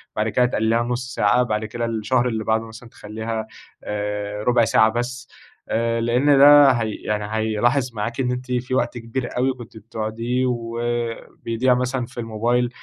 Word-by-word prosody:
بعد 110 Hz, +1 st, 0 dB
كده 125 Hz, +3 st, +3 dB
تقلّليها 115 Hz, -1 st, +1 dB
لنص 125 Hz, +1 st, -3 dB
ساعة، 105 Hz, +4 st, +3 dB
بعد 110 Hz, -2 st, -2 dB
كده 115 Hz, +2 st, -3 dB
الشهر 115 Hz, +2 st, 0 dB
اللي 110 Hz, -3 st, -2 dB
بعده 110 Hz, +1 st, 0 dB
مثلًا 115 Hz, +2 st, -12 dB
تخلّيها 110 Hz, +1 st, -5 dB, 0.4 s
آآ 105 Hz, 0 st, -3 dB
ربع 120 Hz, -1 st, +3 dB
ساعة 110 Hz, 0 st, +4 dB
بس، 125 Hz, +3 st, -4 dB, 0.4 s
آآ، 115 Hz, +1 st, 0 dB
لأن 125 Hz, +5 st, +3 dB
ده 145 Hz, 0 st, +8 dB
هي 115 Hz, -3 st, -1 dB
يعني 105 Hz, -1 st, -3 dB
هيلاحظ 120 Hz, +4 st, +1 dB
معاكِ 115 Hz, +4 st, -4 dB
إن 125 Hz, -1 st, 0 dB
أنتِ 125 Hz, +1 st, -5 dB
في 125 Hz, +1 st, -1 dB
وقت 120 Hz, -1 st, 0 dB
كبير 120 Hz, +2 st, -4 dB
أوي 130 Hz, +1 st, +2 dB
كنتِ 120 Hz, -3 st, -12 dB
بتقعديه 115 Hz, +3 st, -3 dB
وبيضيع 120 Hz, +1 st, -2 dB
مثلًا 125 Hz, 0 st, -1 dB
في 120 Hz, -, -11 dB
الموبايل، 120 Hz, +2 st, 0 dB
115 Hz, 165 wpm, -22 LUFS, 110-125 Hz, 0.4 s, ده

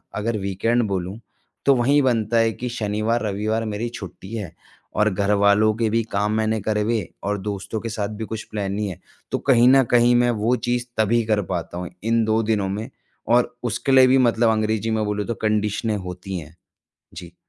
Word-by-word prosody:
अगर 110 Hz, +1 st, -1 dB
वीकेंड 100 Hz, +5 st, 0 dB
बोलूँ 95 Hz, +2 st, -3 dB, 0.5 s
तो 140 Hz, -, +5 dB
वहीं 135 Hz, +4 st, +3 dB
बनता 115 Hz, -3 st, +1 dB
है 115 Hz, 0 st, +3 dB
कि 125 Hz, -, -5 dB
शनिवार 110 Hz, 0 st, -1 dB
रविवार 110 Hz, +2 st, -1 dB
मेरी 110 Hz, +2 st, -3 dB
छुट्टी 95 Hz, +1 st, -9 dB
है। 95 Hz, -7 st, -5 dB, 0.5 s
और 105 Hz, -, +4 dB
घरवालों 100 Hz, +2 st, +3 dB
के 115 Hz, -1 st, +1 dB
भी 115 Hz, +2 st, +1 dB
काम 105 Hz, +1 st, 0 dB
मैंने 110 Hz, 0 st, 0 dB
करे 105 Hz, +1 st, 0 dB
हुए 110 Hz, 0 st, -1 dB, 0.2 s
और 105 Hz, 0 st, -1 dB
दोस्तों 105 Hz, +2 st, -4 dB
के 115 Hz, -, -5 dB
साथ 105 Hz, -2 st, -3 dB
भी -, -, -2 dB
कुछ 110 Hz, 0 st, -5 dB
प्लान 100 Hz, -2 st, -2 dB
नहीं 105 Hz, 0 st, -2 dB
है। 90 Hz, -1 st, -8 dB, 0.3 s
तो -, -, +1 dB
कहीं 120 Hz, -1 st, +6 dB
न 135 Hz, 0 st, +6 dB
कहीं 120 Hz, 0 st, +5 dB
मैं 120 Hz, 0 st, +3 dB
वो 120 Hz, +3 st, +3 dB
चीज़ 120 Hz, 0 st, 0 dB
तभी 115 Hz, +2 st, +2 dB
कर 105 Hz, -2 st, +1 dB
पाता 85 Hz, 0 st, -4 dB
हूँ 90 Hz, -1 st, -5 dB
इन 115 Hz, 0 st, +2 dB
2 110 Hz, +1 st, +2 dB
दिनों 105 Hz, -3 st, 0 dB
में 105 Hz, +3 st, -4 dB, 0.5 s
और 120 Hz, 0 st, +1 dB
उसके 120 Hz, +3 st, -1 dB
लिए 130 Hz, -1 st, +7 dB
भी 130 Hz, +1 st, +5 dB
मतलब 115 Hz, -2 st, +3 dB
अंग्रेजी 110 Hz, 0 st, 0 dB
में 110 Hz, -1 st, 0 dB
बोलूँ 105 Hz, 0 st, -2 dB
तो 115 Hz, -, -1 dB
कंडीशनें 105 Hz, +1 st, 0 dB
होती 90 Hz, 0 st, -6 dB
हैं। 80 Hz, +1 st, -12 dB, 0.6 s
जी। 85 Hz, 0 st, -10 dB
110 Hz, 200 wpm, -22 LUFS, 100-115 Hz, 0.6 s, लिए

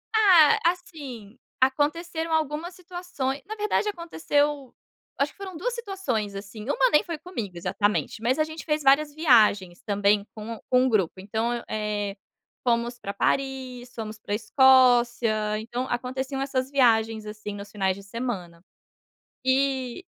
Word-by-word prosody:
Ah, 365 Hz, -9 st, +6 dB
assim, 275 Hz, -, -3 dB, 0.2 s
aconteceram 320 Hz, +5 st, 0 dB
algumas 315 Hz, +3 st, -1 dB
situaçõ 355 Hz, -7 st, -4 dB
na 430 Hz, +3 st, -6 dB
verdade 425 Hz, 0 st, 0 dB
aconteceu 295 Hz, -6 st, -1 dB, 0.5 s
acho 280 Hz, +1 st, +1 dB
que -, -, -31 dB
foram 380 Hz, -4 st, -7 dB
2 485 Hz, +9 st, -2 dB
situações 370 Hz, -, -3 dB
assim, 200 Hz, +2 st, -8 dB
uma -, -, +3 dB
nem 300 Hz, -, +5 dB
foi 335 Hz, -3 st, -5 dB
comigo 235 Hz, -, -6 dB
exatamente. 205 Hz, +4 st, -1 dB
Mas 255 Hz, +5 st, +1 dB
a 310 Hz, -, +5 dB
gente 315 Hz, +1 st, -8 dB
fez 305 Hz, -1 st, 0 dB
várias 290 Hz, +2 st, +4 dB
viagens, 215 Hz, -, +3 dB
também, 205 Hz, 0 st, +2 dB
com 220 Hz, +1 st, -7 dB
com 255 Hz, 0 st, +4 dB
o -, -, +2 dB
grupo. 195 Hz, -5 st, +1 dB
Então, 220 Hz, +5 st, -2 dB
eu 235 Hz, -, -5 dB
eh, 210 Hz, -2 st, -2 dB, 0.5 s
fomos 235 Hz, 0 st, +1 dB
para 200 Hz, -4 st, -6 dB
Paris, 255 Hz, +1 st, -2 dB
fomos 220 Hz, -1 st, -6 dB
para 210 Hz, -1 st, -5 dB
Escócia, 240 Hz, -3 st, +4 dB
então, 240 Hz, +3 st, -4 dB
aconteciam 260 Hz, +2 st, -3 dB
essas 270 Hz, -1 st, -2 dB
viagens, 225 Hz, -4 st, +3 dB
assim, 210 Hz, -1 st, -7 dB
nos 205 Hz, 0 st, -8 dB
finais 190 Hz, -2 st, 0 dB
de 200 Hz, -, -11 dB
semana. 195 Hz, -6 st, -5 dB, 0.8 s
E 265 Hz, +1 st, +1 dB
255 Hz, 145 wpm, -25 LUFS, 215-300 Hz, 0.8 s, Ah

